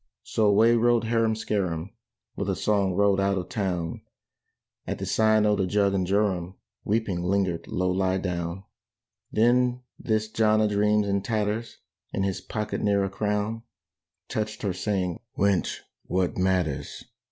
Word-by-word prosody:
So 110 - +1
away 110 +3 +5
rode 120 0 +3
Harum 115 -1 +1
Scarum, 95 -6 -2 0.4
With - - -3
a - - +1
song 100 -3 +1
rode 100 0 +3
out 100 0 +1
of 90 -1 -4
town; 90 -6 -2 0.9
At - - -2
the - - -4
Sign 110 -1 +3
o' 105 0 +3
the 95 -2 0
Jug 100 0 +2
and 95 -2 0
Jorum 95 -2 0 0.3
Weeping 105 -4 0
lingered 90 -2 0
Low 90 0 0
lie 95 0 +1
down. 90 0 -3 0.7
Then 125 +2 +2 0.2
this 110 -1 0
John 110 -1 +2
a 110 - +3
dreams, 105 0 +2
in 100 0 +1
tatters, 110 +1 -2 0.4
In 95 - 0
his 95 -1 -2
pocket 105 +2 -3
ne'er 100 -1 +2
a 95 - -2
crown, 105 +2 -1 0.7
Touched 110 0 -3
her 100 -3 0
saying, 90 -2 -2 0.2
"Wench, 100 -2 +1 0.3
what 90 -1 0
matters! 90 -6 -1
100 Hz, 150 wpm, -26 LUFS, 95-110 Hz, 0.9 s, away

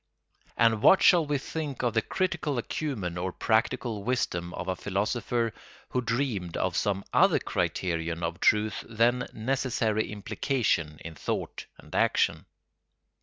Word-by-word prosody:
And 115 -2 +4
what 190 - +6
shall 170 -4 +6
we 145 -1 +1
think 145 -1 -5
of 120 - +1
the 110 - +3
critical 165 -6 -1
acumen 110 - -3
or 95 +1 -2
practical 110 0 0
wisdom 90 -8 -1
of - - -5
a 95 - 0
philosopher 110 +4 -1 0.4
who 125 - 0
dreamed 115 -8 -2
of 90 -2 -1
some 100 -1 0
other - - +5
criterion 85 -1 -2
of 85 0 -3
truth 105 0 +2
than 120 +2 +2
necessary 115 -3 -1
implication 105 - -1
in 80 - -6
thought 80 - -4
and - - -15
action? - - +2
110 Hz, 135 wpm, -28 LUFS, 95-125 Hz, 0.4 s, what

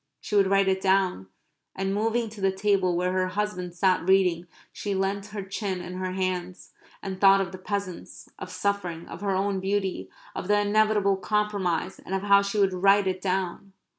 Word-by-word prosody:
She 210 - -4
would 200 -1 +5
write 195 0 +3
it 190 0 +1
down. 190 - +1 0.5
And 195 0 -1
moving 225 +3 0
to 210 -1 -11
the 195 0 +3
table 190 -2 +1
where 180 +1 0
her 185 0 +1
husband 185 -2 -3
sat 185 0 +1
reading 180 -3 +3 0.3
she 200 -1 -3
leant 195 +1 -1
her 205 -1 -6
chin 195 -1 -3
in 175 0 -7
her 185 0 -3
hands 185 -1 -3 0.3
and 190 -1 -5
thought 195 0 +7
of 190 -3 -2
the 185 - -9
peasants, 200 -2 -5
of - - -7
suffering, 185 -3 -2
of 165 - -9
her 200 -2 0
own 195 0 0
beauty, 190 - -2 0.2
of - - -5
the 205 0 +3
inevitable 205 -1 +2
compromise, 195 -3 -1
and 190 - -4
of 195 - -2
how 200 -1 +6
she 200 +1 -3
would 195 -2 +3
write 195 +2 +4
it 185 -1 -2
down. 190 0 -2
195 Hz, 195 wpm, -26 LUFS, 185-200 Hz, 0.5 s, thought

